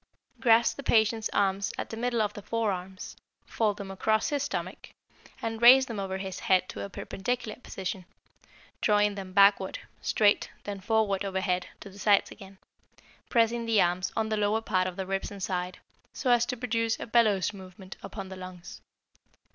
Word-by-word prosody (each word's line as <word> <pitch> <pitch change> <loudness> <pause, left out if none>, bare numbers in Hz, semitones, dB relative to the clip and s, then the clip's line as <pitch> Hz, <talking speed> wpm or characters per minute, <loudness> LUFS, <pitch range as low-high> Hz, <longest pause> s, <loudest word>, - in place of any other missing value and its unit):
Grasp 230 -1 +4
the - - -5
patient's 220 -3 +2
arms 195 0 +1
at - - -5
the - - -4
middle 235 -1 0
of 210 0 -2
the 205 - -8
forearms, 195 -4 -3 0.3
fold 210 -3 0
them 195 -1 -7
across 215 +6 +1
his 290 -2 -1
stomach, 185 -8 -5 0.5
and 225 0 -3
raise 260 +2 +9
them 230 -5 -5
over 190 -1 -3
his 190 -1 -5
head 185 -1 +2
to - - -6
a 200 - -5
perpendicular 215 +4 -4
position, 190 -4 -5 0.8
drawing 210 -1 +3
them 195 -2 -7
backward, 200 0 +4 0.2
straight, 205 -1 +2
then 200 -1 -5
forward 205 -1 +1
overhead 190 -2 -1
to - - -9
the 200 - -14
sides 205 0 +3
again, 195 0 -12 0.7
pressing 230 0 +2
the 225 -2 +3
arms 180 +1 +1
on 220 -1 0
the 215 - 0
lower 210 +1 +1
part 185 -4 0
of 185 - -5
the 190 - -4
ribs 195 +1 -2
and 200 -2 -8
side, 180 -1 -3 0.4
so 255 - 0
as 240 0 +4
to 250 - -3
produce 230 -2 -1
a - - -5
bellows 215 -5 +2
movement 190 -1 -11
upon 195 -2 -7
the 190 - -7
lungs. 185 -1 -10
205 Hz, 180 wpm, -28 LUFS, 190-225 Hz, 0.8 s, raise